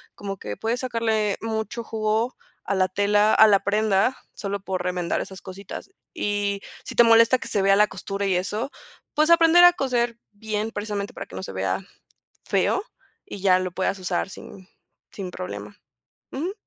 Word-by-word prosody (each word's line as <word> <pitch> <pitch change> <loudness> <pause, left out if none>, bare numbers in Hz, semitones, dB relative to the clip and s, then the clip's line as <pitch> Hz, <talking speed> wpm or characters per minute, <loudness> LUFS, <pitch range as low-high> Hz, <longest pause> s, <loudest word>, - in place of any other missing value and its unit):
como 195 -1 -5
que 105 - -6
puedes 230 +3 -2
sacarle 225 -4 0
mucho 225 +1 -3
jugo 220 +2 -1 0.3
a 200 - 0
la 185 -1 +3
tela, 205 +2 +3
a 220 - +8
la 200 -2 +5
prenda, 210 +3 +2 0.2
solo 200 -1 -3
por 185 -2 -3
remendar 180 -1 -1
esas 190 -2 -8
cositas. 190 - -9 0.2
Y 205 - -1 0.2
si - - -6
te 235 - +7
molesta 230 +2 +6
que - - -7
se 200 - 0
vea 195 0 +5
la 210 0 +5
costura 200 0 -4
y 190 - +2
eso, 210 +9 -2 0.4
pues, 305 +2 +3
aprender 335 +1 +7
a 355 0 +9
coser 240 -6 0
bien, 215 +1 -3
precisamente, 205 -1 -4
para - - -7
que 90 - -12
no - - -4
se 95 - -7
vea 95 - -1 0.6
feo, 390 - +1 0.4
y 200 - -8
ya 185 -1 +4
lo 185 -1 -3
puedas 190 +1 -1
usar 185 +1 -2
sin 190 -1 -12 0.4
sin 190 -3 -6
problema. 100 - -7 0.6
Ujú. 325 +8 -3
205 Hz, 175 wpm, -24 LUFS, 190-230 Hz, 0.6 s, a